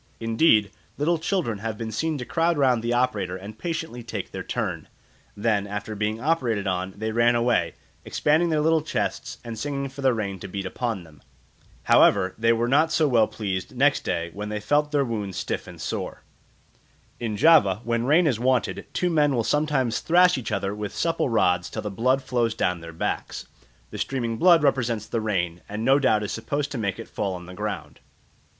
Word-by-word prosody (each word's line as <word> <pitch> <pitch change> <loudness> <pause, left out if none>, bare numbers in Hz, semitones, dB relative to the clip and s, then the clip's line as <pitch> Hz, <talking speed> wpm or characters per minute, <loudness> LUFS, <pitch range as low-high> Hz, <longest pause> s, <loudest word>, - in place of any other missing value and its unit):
Indeed, 115 - +3 0.3
little 160 +3 +1
children 160 - -1
have 110 0 -4
been 110 0 -5
seen 155 +7 -1
to 125 - -5
crowd 165 +2 +1
round 130 -5 +3
the 120 +1 -2
operator 105 -7 0
and 105 +3 -10
patiently 165 -7 -4
take 110 -4 -6
their - - -5
turn; - - -3 0.5
then 105 -1 +1
after 105 +2 -5
being 105 +1 -2
operated 125 -8 0
on, 95 0 -2
they 110 +1 -2
ran 120 +1 +3
away, 120 +1 +1 0.3
expanding 160 +3 +2
their 155 -2 +1
little 160 +1 +3
chests 155 - -3
and 115 -2 -6
singing 140 +1 -3
for 135 +1 -9
the 135 -1 +4
rain 100 -5 -3
to - - -7
beat 95 +1 -5
upon 110 -1 -3
them. 75 -4 -18 0.6
However, 95 0 +4
they 115 +1 +4
were 115 +1 +1
not 155 +5 +3
so 155 -1 +3
well 115 -5 +4
pleased 95 +1 -4
next 140 +2 +3
day, 85 0 -2
when 105 +2 -5
they 105 0 -3
felt 150 +6 +1
their 145 -2 +2
wounds 105 -6 -4
stiff - - -3
and - - -11
sore. - - -4 1.0
In 110 -3 -3
Java, 110 - +5
when 115 0 -1
rain 165 +5 +5
is 125 -8 +1
wanted, 125 -1 0
two 180 -1 0
men 150 -4 +3
will 115 - +1
sometimes 145 -4 +1
thrash 180 +2 +4
each 130 -4 -4
other 100 0 -1
with 105 -1 -5
supple 165 -4 0
rods 90 -6 +2
till - - -5
the 105 - -4
blood 130 +7 +1
flows 120 -3 0
down 90 -6 0
their 85 0 -8
backs; 80 - -3 0.5
the - - -7
streaming 120 -4 -2
blood 170 -3 +6
represents 120 -6 +1
the 115 - -2
rain, 90 -5 -1
and 105 +2 -4
no 135 +2 +5
doubt 110 -6 +2
is 105 - -4
supposed 145 +6 -3
to 135 - -3
make 100 -4 -2
it 115 - -8
fall 100 -2 -3
on 90 -1 -9
the 90 - -10
ground. 105 +3 -5
115 Hz, 200 wpm, -25 LUFS, 105-145 Hz, 1.0 s, blood